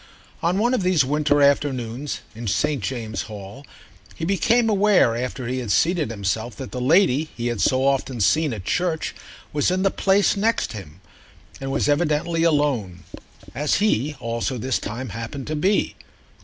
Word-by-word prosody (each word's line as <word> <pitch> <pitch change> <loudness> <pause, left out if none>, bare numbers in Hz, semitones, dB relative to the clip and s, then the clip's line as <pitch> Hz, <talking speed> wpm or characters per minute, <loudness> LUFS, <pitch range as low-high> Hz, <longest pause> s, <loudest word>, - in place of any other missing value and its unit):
On 175 +3 +1
one 240 +5 +2
of 255 - +1
these 180 -6 +3
winter 145 +1 +2
afternoons, 135 -2 0
in 115 +1 -7
St. 110 +7 0
James's 110 -4 -4
Hall, 105 +4 -9 0.5
he 165 - -4
became 230 +5 +2
aware 205 - +4
after 125 +1 -4
he 130 +2 -2
had 120 -5 -3
seated 165 - +2
himself 110 +2 -3
that 130 - -8
the 125 - -4
lady 155 +1 +3
he 120 - -3
had 110 - -4
so 130 +1 +2
often 135 -2 0
seen 150 +9 +2
at 105 -5 -6
church 175 - -1 0.4
was 145 +2 +2
in 185 +1 0
the 195 - +3
place 195 +1 +2
next 220 - 0
him 95 -4 -10 0.6
and 135 0 -4
was 140 - 0
evidently 155 +2 +1
alone, 145 - +1 0.5
as 150 +1 0
he 150 - +1
also 115 +2 -2
this 130 +2 -1
time 120 +4 -5
happened 115 +6 -6
to 155 - -3
be. 190 +7 +1
140 Hz, 170 wpm, -23 LUFS, 115-165 Hz, 0.6 s, aware